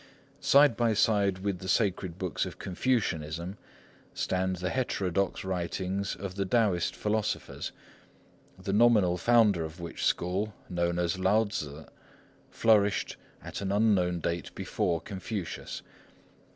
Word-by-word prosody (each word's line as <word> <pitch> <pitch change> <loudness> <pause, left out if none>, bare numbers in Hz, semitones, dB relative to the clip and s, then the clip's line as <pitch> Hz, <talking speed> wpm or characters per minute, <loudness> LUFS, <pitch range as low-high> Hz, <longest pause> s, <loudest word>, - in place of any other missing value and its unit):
Side 140 -3 +5
by 115 -2 +2
side 100 -3 +3
with 100 -3 -1
the 95 - -7
sacred 95 -3 0
books 90 -3 -2
of - - -9
Confucianism 90 -5 -1 0.6
stand 95 0 0
the 90 +1 -3
heterodox 100 -7 -1
writings 95 +2 -2
of 95 -2 -6
the 100 +1 -1
Taoist 100 -4 +1
philosophers, 105 0 -2 0.9
the 95 +1 -3
nominal 105 -5 +5
founder 105 -5 +4
of 80 +2 -7
which 85 -1 -6
school, 100 +4 0
known 85 -1 0
as 90 +1 0
Lao 100 +4 +4
Tzŭ, 75 -7 -5 0.6
flourished 105 -3 +2 0.3
at - - -6
an 100 -1 -2
unknown 100 -5 +2
date 85 -2 -2
before 85 -2 -1
Confucius. 100 -2 -5
95 Hz, 125 wpm, -29 LUFS, 90-105 Hz, 0.9 s, Side